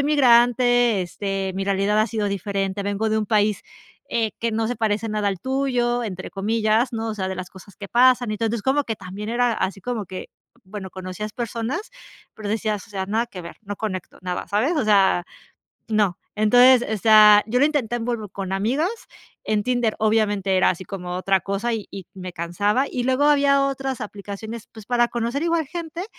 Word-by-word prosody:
soy - - +2
migrante, 245 -5 +4
este 195 +1 -3
mi 195 - -2
realidad 200 +2 +1
ha 215 - +2
sido 215 -1 -2
diferente, 200 0 -2
vengo 205 +2 -1
de 220 - +2
un 215 - -2
país, 210 -1 +2 0.5
eh, 225 -2 0
que 230 - 0
no 220 0 -1
se 245 - -2
parece 220 0 -1
"nada 210 -1 0
al 190 -3 -3
tuyo", 250 -3 0
entre 185 -3 -6
comillas, 220 +4 +1
¿no?, 225 0 -3
o - - -4
sea, 190 -3 -3
de 190 - -3
las 185 0 -7
cosas 190 +1 -15
que 200 - -7
pasan. 245 +1 +4
Entonces, 225 0 -2
como 280 +2 +1
que 225 - -3
también 195 +3 -7
era 240 0 +1
así 195 -2 -3
como 230 -4 -3
que 185 0 -8 0.3
bueno, 190 0 -7
conocías 185 +3 -7
personas, 240 - -4 0.4
pero 210 -2 -6
decías, 215 -2 -2
o - - -20
sea: 190 -2 -3
"Nada 220 +4 0
que 185 -7 -9
ver, 170 - -10
no 205 -1 -6
conecto 190 -5 -5
nada", 180 -1 -4
¿sabes?, 220 +11 +1
o 295 - 0
sea, 195 -4 +4 0.6
no. 210 -5 +1 0.2
Entonces, 245 +3 +6
o 215 - -1
sea, 210 -1 +7
yo 235 +3 +1
lo - - +6
intenté 285 -6 0
en 230 - -4
Bumble 230 -4 -3
con 190 0 -5
amigas, 250 - 0 0.5
en 210 -1 0
Tinder, 245 -2 0
obviamente, 205 -3 +1
era 185 - +4
así 185 +1 -5
como 180 -2 -5
otra 190 0 +1
cosa 200 +6 -2
y 220 -2 -3
y 195 -2 -8
me 185 -1 -7
cansaba, 205 +9 0
y 245 -1 -2
luego 260 +2 +2
había 280 -1 +4
otras 270 -1 -3
aplicaciones, 210 +2 -7
pues, 220 -2 -11
para 240 -1 +2
conocer 240 +5 -2
igual 335 -3 +1
gente, 335 +2 -6
215 Hz, 200 wpm, -23 LUFS, 195-245 Hz, 0.6 s, sea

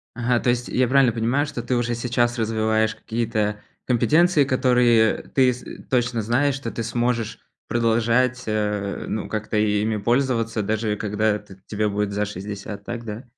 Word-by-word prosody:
Ага, 120 0 +1
то - - +1
есть 120 0 0
я 125 -1 +1
правильно 130 -3 +4
понимаю, 120 +6 +1
что 145 -5 -5
ты 125 +2 -1
уже 120 0 0
сейчас 120 0 0
развиваешь 110 0 +1
какие-то 110 -2 -2 0.2
компетенции. 155 +6 +3
Которые 125 -4 +3
ты 130 -2 +4
с 125 - -11 0.3
точно 125 -2 +1
знаешь, 130 +6 +1
что 135 -4 -5
ты 115 - -4
сможешь 120 0 -1 0.3
продолжать 120 +2 +1
э, 105 -2 -2
ну 110 - -3
как-то 110 0 -3
и 105 -1 +2
ими 110 +1 0
пользоваться, 115 -1 0
даже 110 0 -1
когда 105 +1 0
т 105 -1 -15
тебе 105 0 -1
будет 105 0 -1
за 105 +1 -1
60, 100 +1 -7
так 120 +1 -6
да? 110 +2 -6
115 Hz, 165 wpm, -23 LUFS, 105-125 Hz, 0.3 s, правильно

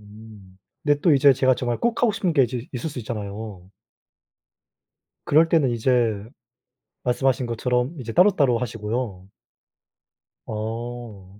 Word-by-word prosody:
음. 105 -2 -15 0.3
근데 145 -1 +2
또 165 0 +4
이제 140 0 +6
제가 130 0 +3
정말 120 -2 -2
꼭 235 -1 0
하고 225 -3 +4
싶은 195 -5 -1
게 140 - +4
이제 120 +1 -5
있을 125 +4 -3
수 145 - -7
있잖아요. 105 -4 -7 1.6
그럴때는 160 -2 +4
이제 115 -3 +1 0.8
말씀하신 130 0 +1
것처럼 125 +4 -1
이제 115 -2 -6
따로따로 150 - +4
하시고요. 105 -4 -4 1.2
어. 110 -3 -6
120 Hz, 260 characters per minute, -23 LUFS, 110-135 Hz, 1.6 s, 이제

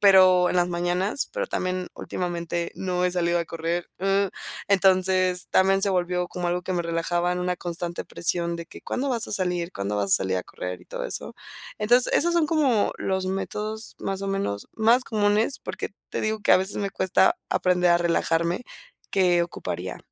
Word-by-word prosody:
pero 185 -3 +6
en - - 0
las 175 0 +3
mañanas, 175 +7 -1
pero - - -2
también 185 - -2
últimamente 170 -1 -3
no 180 -1 -1
he - - 0
salido 175 -1 +1
a 170 - -1
correr, 165 +1 -3
uh. 195 +1 +2 0.4
Entonces, 185 -1 +3
también 195 +1 +3
se 200 - +3
volvió 180 -1 0
como 175 -1 -3
algo 180 +1 -1
que 185 - -3
me 175 - 0
relajaba 170 +1 0
en 180 - -2
una 180 0 -1
constante 175 0 -4
presión 170 0 -1
de 170 0 -7
que: - - -12
"¿Cuándo 275 +2 -2
vas 235 -3 0
a - - -5
salir? 180 -3 -1
¿Cuándo 100 +1 -3
vas 100 -1 +2
a - - +9
salir 95 -1 -1
a 90 - -4
correr?", 90 -1 -6
y - - -21
todo - - -5
eso. - - -3 0.4
Entonces, 240 +4 +4
esos 345 +2 +3
son 330 -3 +3
como 280 -10 +2
los 190 -1 -1
métodos, 210 +3 -3
más 195 0 -3
o - - -2
menos, 195 - -2
más 230 +3 +4
comunes, 215 +4 +1
porque - - -5 0.2
te - - -2
digo 215 0 -1
que - - +4
a - - +8
veces 190 +2 -2
me 200 -1 -2
cuesta 190 -1 +2
aprender 180 -1 +2
a 170 - +5
relajarme 170 +3 +1 0.5
que 180 -3 +3
ocuparía. 90 - -5
180 Hz, 195 wpm, -25 LUFS, 170-200 Hz, 0.5 s, a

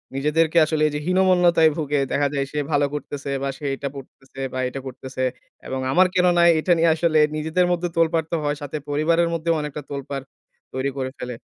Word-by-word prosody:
নিজেদেরকে 160 +4 +1
আসলে 155 0 -1
এই - - -2
যে - - -1
হীনমন্যতায় 180 -3 +4
ভুগে 145 -2 0
দেখা 145 0 +2
যায় 140 -1 0
সে 150 - -2
ভালো 145 -1 +3
করতেছে, 145 -1 -5
বা 140 - -1
সে 150 - -9
এটা 140 0 -4
করতেছে, 135 0 -13
বা 130 - -3
এটা 135 - -6
করতেছে। 130 0 -6 0.4
এবং 130 0 -3
আমার 185 +4 +5
কেন 180 0 +4
নাই? 170 0 +6
এটা 175 - 0
নিয়ে 165 0 +4
আসলে 160 -2 +2 0.2
নিজেদের 160 +4 +1
মধ্যে 175 0 -1
তোলপাড় 165 -1 +2
তো - - +1
হয়। 145 0 0
সাথে 145 +1 -4
পরিবারের 165 +3 +2
মধ্যেও 165 0 0
অনেকটা 150 0 -5
তোলপাড় 140 -1 -5 0.5
তৈরি 135 +1 -1
করে 130 -1 -3
ফেলে। 125 -1 -5
150 Hz, 200 wpm, -22 LUFS, 140-165 Hz, 0.5 s, নাই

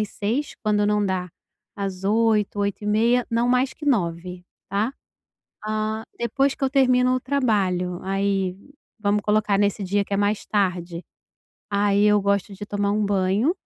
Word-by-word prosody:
às 210 - -1
18h, 235 +11 -2
quando 210 -1 +2
não 210 0 +2
dá, 185 -2 -2 0.5
às 195 -2 -4
20h 215 -1 +2
20:30, 215 +4 +1
não 230 +1 +1
mais 255 +1 +2
que 300 - -10
21 180 -6 -1 0.2
tá. 205 +5 0 0.8
Hã, 215 +1 -2
depois 270 +4 0
que - - -5
eu 265 - +2
termino 255 -2 +3
o 255 - 0
trabalho, 195 -10 0
aí, 195 -1 0 0.4
vamos 205 0 +1
colocar 210 -1 +1
nesse 205 0 +1
dia 200 +2 +1
que 200 - -6
é - - -1
mais 205 +1 0
tarde, 180 -4 -1 0.6
aí, 205 0 +2
eu 210 0 +4
gosto 200 0 0
de 205 - -7
tomar 205 -1 -1
um 210 0 +1
banho, 200 - +1
205 Hz, 160 wpm, -23 LUFS, 195-225 Hz, 0.8 s, eu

